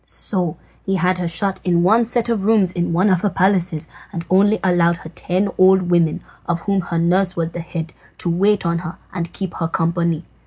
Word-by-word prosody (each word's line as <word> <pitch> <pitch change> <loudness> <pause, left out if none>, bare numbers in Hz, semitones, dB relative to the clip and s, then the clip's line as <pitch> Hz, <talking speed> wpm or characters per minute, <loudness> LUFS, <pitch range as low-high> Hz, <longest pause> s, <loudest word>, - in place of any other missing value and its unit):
So 180 -6 -3 0.3
he 195 - -1
had 185 0 +1
her 175 - -1
shut 185 +4 -1
in 175 -2 +2
one 220 +6 +4
set 240 0 -1
of 230 -4 -1
rooms 205 -4 +3
in 175 -1 -2
one 180 +4 +2
of 185 -3 +2
her 205 - +1
palaces, 185 -4 +1 0.2
and 170 -1 -5
only 205 +3 +4
allowed 175 -2 +3
her 160 - -10
ten 185 +5 -1
old 185 -1 +5
women, 170 -3 +2 0.2
of 170 -1 -1
whom 195 +1 0
her 170 -1 -4
nurse 180 +3 +2
was 165 -1 -2
the 175 - -6
head, 165 -1 -6 0.2
to - - -3
wait 195 +4 +2
on 170 0 0
her 170 0 -7 0.2
and 170 -2 -4
keep 190 -3 -5
her 165 - -2
company. 165 0 -1
180 Hz, 210 wpm, -19 LUFS, 170-195 Hz, 0.3 s, old